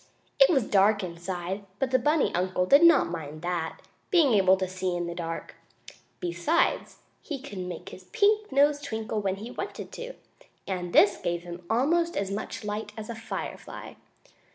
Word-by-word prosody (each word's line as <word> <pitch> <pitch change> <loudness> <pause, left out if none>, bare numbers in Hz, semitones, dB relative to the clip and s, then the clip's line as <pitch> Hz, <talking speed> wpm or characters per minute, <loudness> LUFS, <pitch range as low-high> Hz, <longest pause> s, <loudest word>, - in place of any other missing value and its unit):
It - - +8
was 275 -8 +3
dark 205 0 +3
inside, 180 +2 -4
but 260 +2 -1
the 260 - +4
bunny 300 +4 +2
uncle 180 +1 0
did 280 - +6
not 335 - +6
mind 155 -1 -6
that, 175 -2 -3 0.3
being 325 - +4
able 190 -2 +5
to 190 0 -2
see 185 -1 -2
in 175 0 -2
the 170 - -4
dark. 165 -1 -5 0.7
Besides, 175 - 0 0.3
he 290 -5 -5
could 255 -8 -8
make 180 -2 -6
his 185 - -12
pink 420 - +2
nose 285 +2 +4
twinkle 220 -3 -3
when 190 -1 -1
he 220 +5 -8
wanted 395 - -6
to, - - -7 0.5
and 180 -2 -3
this 205 +3 +5
gave 175 0 -3 0.2
almost 335 +9 +2
as 195 -1 -1
much 210 +2 -5
light 210 0 -4
as 220 +1 -6
a - - -6
firefly. 225 0 -7
205 Hz, 170 wpm, -27 LUFS, 180-275 Hz, 0.7 s, It